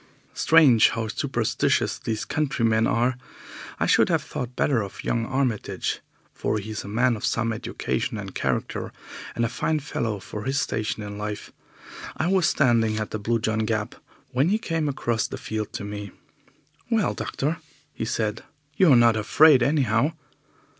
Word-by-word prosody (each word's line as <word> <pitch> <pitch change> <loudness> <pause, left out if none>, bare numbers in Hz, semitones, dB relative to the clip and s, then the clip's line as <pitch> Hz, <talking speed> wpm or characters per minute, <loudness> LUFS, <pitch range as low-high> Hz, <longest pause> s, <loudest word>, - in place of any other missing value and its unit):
Strange 145 -9 +6
how 115 -1 -3
superstitious 110 - 0
these 110 -1 -3
countrymen 115 -7 +1
are! 125 +2 +1 0.6
I - - +2
should - - +4
have - - +1
thought 125 0 -5
better 130 -6 +2
of 100 -1 -7
young 115 -1 -1
Armitage, 130 -5 -1 0.3
for - - -1
he 105 +1 -5
is 110 - -4
a - - -9
man 120 +4 +2
of 105 - -8
some 115 0 0
education 110 - -3
and - - -7
character, - - -2 0.4
and 115 - +1
a - - +1
very 120 - -9
fine 155 -1 +1
fellow 115 -7 -3
for 105 +2 -7
his 135 +2 0
station 110 -3 -2
in 105 0 -7
life. 105 0 -5 0.7
I 160 - 0
was 185 -1 +3
standing 115 -5 +2
at 110 -1 -3
the 110 - -3
Blue 115 +3 0
John 110 -1 -1
Gap 110 -1 -1 0.4
when 135 +6 +2
he 210 - +3
came 165 -8 -1
across 120 -5 -1
the - - -6
field 110 -1 -4
to - - -4
me. 105 0 -6 0.8
"Well, 225 -4 +2
doctor," 150 +4 -2 0.5
said 110 -1 -1 0.3
he, 155 - 0
"you're 145 -7 +7
not 120 -1 +5
afraid, 135 +6 +5
anyhow." 130 +1 +2
115 Hz, 165 wpm, -25 LUFS, 110-135 Hz, 0.8 s, you're